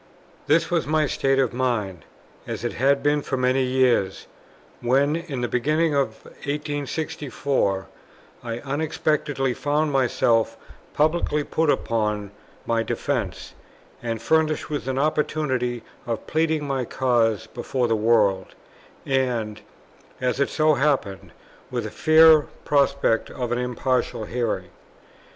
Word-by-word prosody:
This 165 Hz, +3 st, +3 dB
was 170 Hz, -4 st, +1 dB
my 155 Hz, 0 st, +2 dB
state 135 Hz, -1 st, +1 dB
of 130 Hz, -4 st, +1 dB
mind, 110 Hz, -8 st, -2 dB, 0.4 s
as -, -, -5 dB
it 120 Hz, -, -2 dB
had 140 Hz, +2 st, +2 dB
been 145 Hz, 0 st, +2 dB
for 135 Hz, -, -3 dB
many 130 Hz, +1 st, +2 dB
years, 125 Hz, -6 st, +1 dB, 0.5 s
when, 140 Hz, +5 st, +2 dB
in 165 Hz, -7 st, -4 dB
the 120 Hz, -, 0 dB
beginning 150 Hz, +6 st, +1 dB
of 140 Hz, -1 st, -1 dB, 0.2 s
1864, 145 Hz, -7 st, -2 dB, 0.6 s
I 115 Hz, -1 st, -4 dB
unexpectedly 145 Hz, -2 st, -1 dB
found 150 Hz, +3 st, 0 dB
myself 115 Hz, -4 st, +2 dB, 0.4 s
publicly 150 Hz, -1 st, +1 dB
put 160 Hz, +2 st, 0 dB
upon 105 Hz, -5 st, 0 dB, 0.3 s
my 115 Hz, -1 st, +1 dB
defence, 115 Hz, -3 st, -3 dB, 0.5 s
and 115 Hz, -2 st, -3 dB
furnished 155 Hz, +1 st, +1 dB
with 145 Hz, -3 st, -3 dB
an 130 Hz, 0 st, -1 dB
opportunity 135 Hz, -5 st, 0 dB, 0.2 s
of 115 Hz, -1 st, -3 dB
pleading 160 Hz, -1 st, 0 dB
my 135 Hz, -2 st, -1 dB
cause 115 Hz, -3 st, +1 dB
before 120 Hz, +2 st, -2 dB
the 115 Hz, -, +2 dB
world, 105 Hz, -4 st, +2 dB, 0.5 s
and, 125 Hz, -6 st, -1 dB, 0.6 s
as 125 Hz, +1 st, -1 dB
it 140 Hz, -, +2 dB
so 155 Hz, 0 st, +3 dB
happened, 135 Hz, -9 st, 0 dB, 0.4 s
with -, -, -3 dB
a -, -, -5 dB
fair 155 Hz, -1 st, +6 dB, 0.2 s
prospect 140 Hz, -5 st, +2 dB
of 125 Hz, -3 st, -4 dB
an 120 Hz, -, 0 dB
impartial 125 Hz, -2 st, -1 dB
hearing. 115 Hz, -7 st, -2 dB
130 Hz, 125 wpm, -24 LUFS, 120-150 Hz, 0.6 s, fair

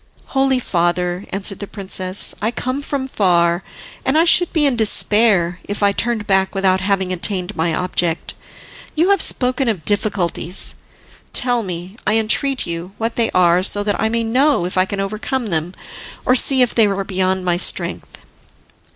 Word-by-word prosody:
"Holy 270 Hz, -1 st, +2 dB
father," 175 Hz, -3 st, -1 dB
answered 195 Hz, 0 st, -3 dB
the 205 Hz, -, -6 dB
princess, 190 Hz, -1 st, 0 dB
"I 215 Hz, -, +1 dB
come 255 Hz, +3 st, -3 dB
from 280 Hz, -2 st, -3 dB
far, 175 Hz, -6 st, +2 dB, 0.4 s
and 265 Hz, +3 st, +1 dB
I 325 Hz, -, +4 dB
should 350 Hz, 0 st, +4 dB
be 310 Hz, -3 st, +2 dB
in 275 Hz, -3 st, +2 dB
despair 210 Hz, -5 st, +2 dB
if 205 Hz, +1 st, -4 dB
I 200 Hz, -, +4 dB
turned 225 Hz, +1 st, -2 dB
back 190 Hz, -1 st, +1 dB
without 190 Hz, -1 st, +1 dB
having 190 Hz, -1 st, 0 dB
attained 185 Hz, +2 st, -1 dB
my 165 Hz, +1 st, 0 dB
object. 175 Hz, -1 st, -2 dB, 0.6 s
You 340 Hz, +5 st, +3 dB
have 395 Hz, -4 st, +3 dB
spoken 255 Hz, +1 st, +1 dB
of 190 Hz, -9 st, -2 dB
difficulties; 195 Hz, -4 st, -1 dB, 0.6 s
tell 245 Hz, -1 st, +1 dB
me, 180 Hz, +1 st, -7 dB
I 215 Hz, -, +3 dB
entreat 255 Hz, +5 st, +1 dB
you, 170 Hz, +2 st, -6 dB
what 225 Hz, +1 st, -3 dB
they 230 Hz, -1 st, +1 dB
are, 180 Hz, -1 st, +4 dB
so 205 Hz, +2 st, +3 dB
that 205 Hz, 0 st, -1 dB
I 220 Hz, -, +1 dB
may 230 Hz, +1 st, -1 dB
know 255 Hz, -2 st, +2 dB
if 180 Hz, -, -5 dB
I 185 Hz, 0 st, +3 dB
can 200 Hz, +1 st, -5 dB
overcome 215 Hz, +4 st, -3 dB
them, 165 Hz, 0 st, -1 dB, 0.5 s
or 255 Hz, -, +4 dB
see 260 Hz, 0 st, +3 dB
if 245 Hz, -, -1 dB
they 225 Hz, -3 st, +4 dB
are 195 Hz, 0 st, -2 dB
beyond 190 Hz, -1 st, -1 dB
my 175 Hz, -1 st, +1 dB
strength." -, -, 0 dB
200 Hz, 175 wpm, -18 LUFS, 180-240 Hz, 0.6 s, I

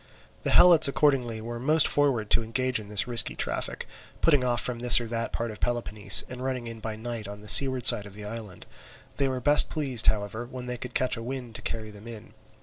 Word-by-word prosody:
The -, -, -3 dB
Helots 170 Hz, -4 st, +6 dB
accordingly 135 Hz, -6 st, 0 dB
were 120 Hz, +1 st, -7 dB
most 150 Hz, +4 st, +2 dB
forward 130 Hz, -7 st, 0 dB
to -, -, +4 dB
engage 125 Hz, +2 st, -2 dB
in 105 Hz, -1 st, -11 dB
this 105 Hz, -1 st, +1 dB
risky 120 Hz, -1 st, 0 dB
traffic, -, -, -4 dB, 0.3 s
putting 145 Hz, -5 st, +2 dB
off 120 Hz, -1 st, 0 dB
from 125 Hz, -2 st, -4 dB
this 125 Hz, 0 st, +8 dB
or 120 Hz, -, -6 dB
that 115 Hz, 0 st, -4 dB
part 115 Hz, -1 st, -4 dB
of 105 Hz, -, -11 dB
Peloponnese, 110 Hz, -4 st, 0 dB
and 125 Hz, 0 st, -8 dB
running 130 Hz, -2 st, -4 dB
in 115 Hz, -1 st, -8 dB
by 110 Hz, 0 st, -6 dB
night 115 Hz, -1 st, -7 dB
on 105 Hz, 0 st, -10 dB
the 105 Hz, -, -13 dB
seaward 130 Hz, 0 st, +3 dB
side 105 Hz, -, +5 dB
of 100 Hz, -, -14 dB
the 105 Hz, 0 st, -10 dB
island. 105 Hz, -3 st, -9 dB, 0.5 s
They 140 Hz, -, +1 dB
were 130 Hz, -1 st, -3 dB
best 145 Hz, +4 st, +4 dB
pleased, 135 Hz, -7 st, +1 dB
however, 110 Hz, +2 st, -1 dB
when 125 Hz, 0 st, -9 dB
they 125 Hz, 0 st, -5 dB
could 125 Hz, 0 st, -8 dB
catch 130 Hz, -1 st, 0 dB
a -, -, -7 dB
wind 125 Hz, -1 st, -7 dB
to -, -, -6 dB
carry 110 Hz, -1 st, -5 dB
them 105 Hz, +2 st, -14 dB
in. 115 Hz, -3 st, -11 dB
120 Hz, 230 wpm, -26 LUFS, 110-130 Hz, 0.5 s, this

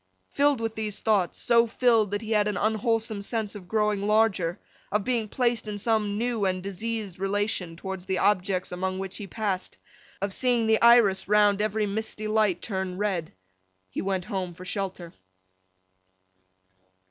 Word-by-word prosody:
Filled 285 Hz, -2 st, +2 dB
with 225 Hz, -1 st, -2 dB
these 215 Hz, -2 st, -4 dB
thoughts—so 220 Hz, +3 st, +2 dB
filled 230 Hz, -3 st, +3 dB
that 205 Hz, +2 st, -3 dB
he 220 Hz, -, -6 dB
had 210 Hz, -1 st, +3 dB
an 210 Hz, -2 st, -1 dB
unwholesome 220 Hz, 0 st, 0 dB
sense 215 Hz, 0 st, -2 dB
of 195 Hz, -4 st, -10 dB
growing 210 Hz, -1 st, +1 dB
larger, 210 Hz, -5 st, +2 dB, 0.3 s
of 210 Hz, 0 st, +1 dB
being 235 Hz, -2 st, 0 dB
placed 240 Hz, -1 st, 0 dB
in 210 Hz, -1 st, -4 dB
some 210 Hz, -1 st, 0 dB
new 235 Hz, -1 st, -1 dB
and 185 Hz, -1 st, 0 dB
diseased 200 Hz, -1 st, -4 dB
relation 195 Hz, -3 st, -1 dB
towards 190 Hz, +1 st, -6 dB
the 190 Hz, -, 0 dB
objects 185 Hz, -2 st, +1 dB
among 185 Hz, +1 st, -2 dB
which 190 Hz, 0 st, -4 dB
he 205 Hz, -, -6 dB
passed, 200 Hz, -3 st, -3 dB, 0.4 s
of 200 Hz, 0 st, -2 dB
seeing 245 Hz, -1 st, +2 dB
the 220 Hz, 0 st, +3 dB
iris 235 Hz, -5 st, +5 dB
round 205 Hz, 0 st, +4 dB
every 215 Hz, 0 st, 0 dB
misty 215 Hz, +1 st, -4 dB
light 215 Hz, -4 st, +1 dB
turn 190 Hz, -3 st, -3 dB
red—he 95 Hz, -, -5 dB
went 190 Hz, -2 st, -2 dB
home 185 Hz, -3 st, -4 dB
for 185 Hz, -, -10 dB
shelter. 185 Hz, -3 st, -4 dB
205 Hz, 155 wpm, -26 LUFS, 190-220 Hz, 0.4 s, iris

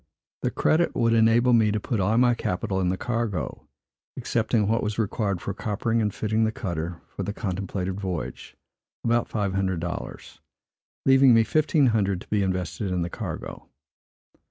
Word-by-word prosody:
This -, -, -1 dB
credit 170 Hz, +2 st, +2 dB
would 115 Hz, -2 st, +2 dB
enable 115 Hz, +2 st, +4 dB
me 110 Hz, -2 st, +4 dB
to 110 Hz, -, 0 dB
put 115 Hz, 0 st, -2 dB
all 105 Hz, +4 st, +2 dB
my 120 Hz, 0 st, +5 dB
capital 95 Hz, -3 st, -2 dB
in 90 Hz, -, +1 dB
the 95 Hz, -, -1 dB
cargo, 115 Hz, -3 st, -3 dB, 0.5 s
excepting 110 Hz, -4 st, 0 dB
what 115 Hz, +2 st, +1 dB
was 105 Hz, 0 st, -2 dB
required 100 Hz, -4 st, -1 dB
for 100 Hz, -, -3 dB
coppering 110 Hz, +3 st, -1 dB
and 105 Hz, -1 st, 0 dB
fitting 110 Hz, +2 st, 0 dB
the 110 Hz, -, +1 dB
cutter 85 Hz, -5 st, -4 dB
for -, -, -7 dB
the 105 Hz, -, -3 dB
contemplated 95 Hz, -2 st, -3 dB
voyage, 90 Hz, -5 st, -5 dB, 0.5 s
about 120 Hz, 0 st, +1 dB
five 100 Hz, -4 st, -1 dB
hundred 95 Hz, -2 st, 0 dB
dollars; 85 Hz, 0 st, -6 dB, 0.6 s
leaving 135 Hz, -2 st, +6 dB
me 115 Hz, -, +5 dB
fifteen 155 Hz, +3 st, +2 dB
hundred 100 Hz, -4 st, +1 dB
to -, -, -13 dB
be 105 Hz, -1 st, +1 dB
invested 90 Hz, 0 st, -2 dB
in 90 Hz, -1 st, 0 dB
the 85 Hz, -, -5 dB
cargo. -, -, -6 dB
105 Hz, 170 wpm, -25 LUFS, 95-115 Hz, 0.6 s, leaving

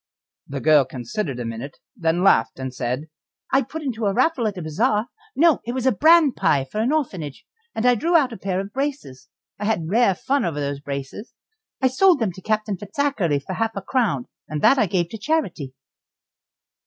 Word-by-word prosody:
The 140 Hz, -1 st, -5 dB
girl 150 Hz, -2 st, +5 dB
considered 130 Hz, -, -4 dB
a 120 Hz, -, -4 dB
minute, 115 Hz, +5 st, -6 dB, 0.2 s
then 165 Hz, +2 st, 0 dB
laughed, 115 Hz, -12 st, +3 dB
and 130 Hz, -1 st, -5 dB
said: 130 Hz, +4 st, -3 dB, 0.5 s
"I 270 Hz, -, +5 dB
put 305 Hz, +5 st, -7 dB
into 230 Hz, -6 st, -2 dB
a 200 Hz, -, +1 dB
raffle 255 Hz, -3 st, +2 dB
at 205 Hz, -3 st, -4 dB
a -, -, -4 dB
bazaar 210 Hz, -, +1 dB, 0.3 s
no, 325 Hz, -1 st, +4 dB
it 240 Hz, -, -4 dB
was 255 Hz, -1 st, -3 dB
a 260 Hz, -, +5 dB
bran 315 Hz, -, +5 dB
pie 140 Hz, -, +1 dB
for 175 Hz, +11 st, -5 dB
an 240 Hz, +5 st, +1 dB
orphanage 185 Hz, -, -3 dB, 0.3 s
and 220 Hz, -, -1 dB
I 250 Hz, -, +6 dB
drew 335 Hz, +8 st, +3 dB
out 265 Hz, -6 st, +1 dB
a -, -, -7 dB
pair 185 Hz, -1 st, -2 dB
of 195 Hz, +1 st, -6 dB
braces. 260 Hz, -, -4 dB, 0.3 s
I 205 Hz, -, -3 dB
had 180 Hz, -6 st, -1 dB
rare 225 Hz, -3 st, +3 dB
fun 275 Hz, +9 st, 0 dB
over 160 Hz, -4 st, -2 dB
those 140 Hz, -1 st, -3 dB
braces, 140 Hz, -, -7 dB, 0.5 s
I -, -, +6 dB
sold 350 Hz, +8 st, +4 dB
them 220 Hz, -5 st, 0 dB
to 190 Hz, -, -12 dB
Captain 215 Hz, -1 st, -1 dB
Fitzakerly 205 Hz, -, -1 dB
for 190 Hz, -, -4 dB
half 225 Hz, +3 st, -1 dB
a 195 Hz, -, -3 dB
crown, 200 Hz, -, 0 dB, 0.2 s
and 150 Hz, 0 st, -4 dB
that 270 Hz, -, +6 dB
I 215 Hz, -, +3 dB
gave 175 Hz, -2 st, 0 dB
to 225 Hz, -, -7 dB
the -, -, -27 dB
charity." 210 Hz, -, -1 dB
200 Hz, 205 wpm, -22 LUFS, -, 0.5 s, I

